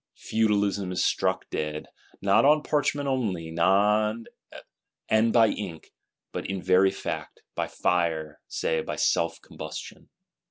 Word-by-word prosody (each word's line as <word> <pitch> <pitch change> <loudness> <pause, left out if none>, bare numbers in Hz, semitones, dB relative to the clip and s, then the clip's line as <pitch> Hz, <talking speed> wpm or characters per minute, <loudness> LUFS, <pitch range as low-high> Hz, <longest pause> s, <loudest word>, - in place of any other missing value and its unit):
Feudalism 100 -3 0
is 90 - 0
struck - - 0
dead; 75 0 -3 0.4
not 100 0 +4
on 150 +1 +5
parchment 145 -1 0
only, 105 -12 -1
and 105 +3 0
by 115 -1 +5
ink; 85 -6 -6 0.4
but - - -4
in 95 -1 -3
very 95 +1 +4
fact, 95 - -6
by - - -2
fire; 80 -3 -1
say, 80 -1 -1
by - - -4
self 85 0 +1
combustion. - - -9
100 Hz, 120 wpm, -26 LUFS, 85-110 Hz, 0.4 s, on